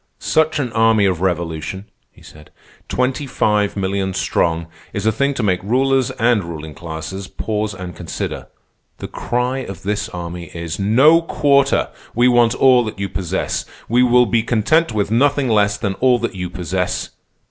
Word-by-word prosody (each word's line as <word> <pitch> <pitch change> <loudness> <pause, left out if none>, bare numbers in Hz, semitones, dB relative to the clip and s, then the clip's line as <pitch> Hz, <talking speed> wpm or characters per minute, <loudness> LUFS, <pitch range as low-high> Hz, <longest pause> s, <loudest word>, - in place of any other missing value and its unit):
"Such 160 0 +1
an 130 -5 -2
army 110 -2 +4
of 90 -3 0
revolution," 85 +1 -2 0.3
he - - -20
said, 75 0 -15 0.4
"twenty 130 +3 -1
five 105 -4 0
millions 95 -1 -1
strong, 85 0 0 0.3
is 100 0 -3
a 110 - +4
thing 140 +5 0
to 125 - -2
make 90 -3 +1
rulers 130 +5 +1
and 115 -3 +2
ruling 80 -2 -7
classes 85 +4 -7
pause 105 -2 -3
and 90 -2 -7
consider. - - -5 0.5
The - - -6
cry 125 +2 -2
of 95 -8 -8
this 105 +1 -2
army 85 0 -6
is: 85 +1 -5
'No 135 +12 +5
quarter! 140 -4 +2 0.3
We 120 +2 +4
want 120 -1 +4
all 130 -2 +5
that 110 - -6
you 100 0 -3
possess. 90 -4 -2 0.2
We 120 +2 +3
will 125 0 +5
be 115 +1 +1
content 120 +9 +2
with 105 -2 -1
nothing 140 +2 +2
less 105 -2 +2
than 100 -1 -2
all 125 +4 +3
that - - -3
you 90 -1 -4
possess. 90 +1 -3
105 Hz, 170 wpm, -19 LUFS, 95-125 Hz, 0.5 s, No